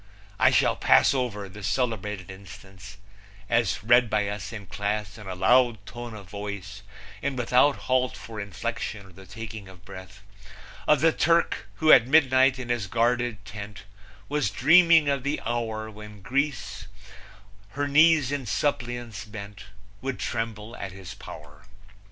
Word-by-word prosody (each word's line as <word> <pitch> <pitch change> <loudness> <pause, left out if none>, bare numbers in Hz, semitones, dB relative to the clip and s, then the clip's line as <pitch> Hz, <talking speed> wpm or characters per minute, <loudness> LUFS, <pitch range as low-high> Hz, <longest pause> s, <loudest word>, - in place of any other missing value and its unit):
I - - +6
shall - - +3
pass 65 - +4
over 115 -7 -2
the 100 +3 -11
celebrated 105 -5 -2
instance 95 0 -12 0.5
as 120 -3 0
read 120 +1 +5
by 105 -1 0
us 105 +1 -6
in 105 -3 -8
class 100 +2 -3
in 105 -3 -11
a 95 - -5
loud 115 +2 +3
tone 120 -1 -8
of 100 -3 -11
voice 100 0 -7 0.4
and 140 -1 -2
without 125 +4 +3
halt 130 -1 +1
for 110 -1 -9
inflection 105 +1 -5
or 95 - -16
the 95 +2 -15
taking 110 0 -8
of 95 -2 -15
breath 95 +1 -11 0.6
of 150 -2 +4
the 165 0 +5
Turk 170 +1 +1
who 155 -1 +4
at 120 -1 +7
midnight 130 -2 +4
in 125 -2 -7
his 120 -5 -1
guarded 120 -1 0
tent 100 -1 -9 0.4
was 145 -6 0
dreaming 165 - +5
of 140 -1 +1
the 140 +4 -2
hour 110 -2 -3
when 105 -2 -12
Greece 105 - -2 0.9
her 145 +1 -1
knees 150 -1 +4
in 140 -4 -3
suppliance 120 -2 -2
bent 100 -2 -10 0.4
would 135 0 -3
tremble 115 -1 -4
at 100 - -6
his 95 -1 -9
power. 75 +3 -12
110 Hz, 150 wpm, -26 LUFS, 100-130 Hz, 0.9 s, at